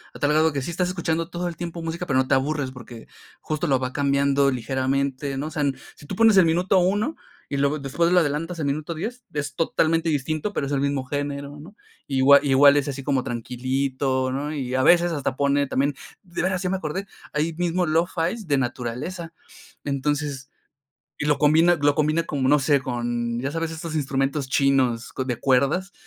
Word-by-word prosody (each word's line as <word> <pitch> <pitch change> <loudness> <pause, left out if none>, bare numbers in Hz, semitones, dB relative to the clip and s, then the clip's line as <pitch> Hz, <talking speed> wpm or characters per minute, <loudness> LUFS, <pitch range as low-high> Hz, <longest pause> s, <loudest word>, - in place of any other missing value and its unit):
a - - -9
tal 145 - +2
grado 155 +1 +3
que 140 - -2
sí 170 - -4
estás 180 +1 -1
escuchando 165 -2 -2
todo 175 0 -3
el 170 - -5
tiempo 170 0 -5
música, 165 +2 -4
pero 135 - +1
no 130 0 +2
te - - +2
aburres 140 0 -1
porque 120 -3 -11 0.3
justo 155 +2 -3
lo 135 -3 +3
va 130 0 -3
cambiando 140 0 +2
ligeramente, 135 +2 -1
¿no? 145 - -3
O - - -7
sea 150 - -3
n 140 -1 +1 0.2
si - - -15
tú 190 - -5
pones 220 -1 +5
el 185 - +7
minuto 180 +4 +2
1 205 - +1 0.3
y 140 - -2
luego 140 +2 +1
después 140 +5 0
lo 180 - +6
adelantas 165 +2 -2
al 155 - -1
minuto 150 +4 -2
10 235 +9 -5
es 145 -2 -3
totalmente 165 +1 +1
distinto, 155 +6 -2
pero 140 - -1
es - - -5
el 140 -1 0
mismo 140 -1 0
género, 145 +1 -4
¿no?, 175 +8 -13 0.3
igua 135 +1 +6
igual 140 +1 +6
es 145 0 0
así 140 -1 -4
como 135 -2 0
tranquilito, 130 +2 -1
¿no?, 145 +3 -3
y, 130 -4 -3
a 130 - +2
veces, 175 +2 +5
hasta 145 -5 -2
pone 140 +1 +2
también 140 +2 0 0.3
De 175 -3 -5
veras, 185 0 0
ya 185 - -1
me 190 - 0
acordé, 185 +3 -4 0.3
ahí 155 +2 0
mismo 175 +1 0
lofi 170 +5 0
de 145 -2 +2
naturaleza. 130 +8 -4 0.5
Entonces, 140 0 -2 0.7
y 150 - -2
lo 150 -2 +2
combina 160 +4 +4
lo 145 0 +3
combina 155 +2 +1
como, 140 -5 -1
no 150 +2 +5
sé, 140 +1 +3
con, 120 -2 -2
ya 135 +3 -2
sabes, 165 0 -2
estos 160 0 -6
instrumentos 135 -1 -1
chinos 130 -4 +1
co 130 - -3
de 125 -3 -3
cuerdas 140 +9 +1
145 Hz, 205 wpm, -24 LUFS, 135-165 Hz, 0.7 s, el